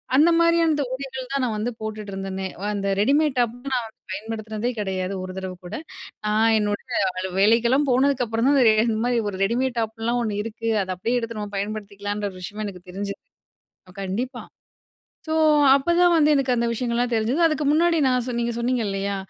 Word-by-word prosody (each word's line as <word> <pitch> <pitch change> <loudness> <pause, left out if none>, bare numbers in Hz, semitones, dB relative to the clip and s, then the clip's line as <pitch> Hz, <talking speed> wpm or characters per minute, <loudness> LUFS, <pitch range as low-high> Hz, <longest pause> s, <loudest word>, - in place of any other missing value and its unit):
அந்த 310 +5 +6
மாதிரியான 335 -1 +4
இந்த 290 -1 0
உடைகள் 265 -1 -6
தான் 275 -1 0
நான் 235 -3 0
வந்து 235 +4 -2
போட்டுட்டு 215 -2 -5
இருந்தனே, 195 0 -4 0.2
அந்த 200 -1 -2
ரெடிமேட் 280 +4 +2
டாப் 240 -1 +1 0.2
நான் 245 -3 0
வந்து 220 - -21
பயன்படுத்துனதே 220 +3 -4
கிடையாது, 190 -1 -2
ஒரு 185 - -6
தடவ 190 -1 -4
கூட. 190 - -6 0.5
நான் 220 +1 +3
என்னோடய 205 0 -1
அலு 190 0 -3
வேலைக்கெல்லாம் 235 +7 +4
போனதுக்கு 260 0 +2
அப்புறம் 225 +3 0
தான் 285 - +4
இந்த 230 -4 +6 0.2
இந்த 220 -1 0
மாதிரி 240 -2 +1
ஒரு 190 - -6
ரெடிமேட் 245 +4 0
டாப்லாம் 225 +2 -1
ஒண்ணு 205 -2 -2
இருக்கு. 230 0 -4
அத 185 - -10
அப்படியே 235 +6 0
எடுத்து 230 -1 -5
நம்ம 205 -1 -6
பயன்படுத்திக்கலான்ற 205 0 -4
விஷயமே 210 +4 -5
எனக்கு 180 -2 -10
தெரிஞ்சது! 200 +1 -5 0.8
கண்டிப்பா. 215 +7 -3 0.8
ஸோ 315 - -3 0.4
அப்பதான் 345 +5 +3
வந்து 305 -2 +4
எனக்கு 270 -2 +1
அந்த 235 0 +1
விஷயங்கள்லாம் 240 +1 -1
தெரிஞ்சது. 230 +8 +1
அதுக்கு 310 -1 0
முன்னாடி 335 +2 +3
நான் 250 -1 +2
சொன் 240 -1 -2
நீங்க 235 0 -1
சொன்னீங்க 245 0 0
இல்லயா, 195 0 -2
230 Hz, 175 wpm, -23 LUFS, 205-255 Hz, 0.8 s, அந்த